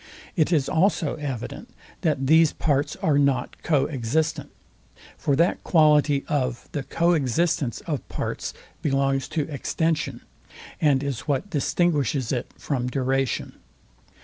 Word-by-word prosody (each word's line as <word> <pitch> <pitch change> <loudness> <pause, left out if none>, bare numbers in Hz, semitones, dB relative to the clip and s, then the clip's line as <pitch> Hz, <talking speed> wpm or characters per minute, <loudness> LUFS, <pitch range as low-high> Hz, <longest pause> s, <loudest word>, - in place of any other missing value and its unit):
It 160 -2 +2
is 150 -6 +2
also 165 -3 +2
evident, 135 -6 -5 0.3
that 145 -5 0
these 160 +2 +5
parts 145 -2 0
are 145 -2 +3
not 135 -3 0
co 145 -4 +2
existent: 150 +4 -1 0.7
For 140 - 0
that 170 +5 +2
quality 150 -3 +4
of 130 -6 -1
the 145 - -2
co 170 +6 +1
existence 150 -2 0
of 150 -5 -4
parts - - -3 0.3
belongs 135 -1 +1
to 155 -3 -2
extension, 150 -3 -1 0.6
and 140 -3 +3
is 140 0 -4
what 150 +8 -1
distinguishes 145 - +1
it 125 -2 -2
from 125 -4 -2
duration. 135 0 -1
145 Hz, 125 wpm, -24 LUFS, 135-160 Hz, 0.7 s, these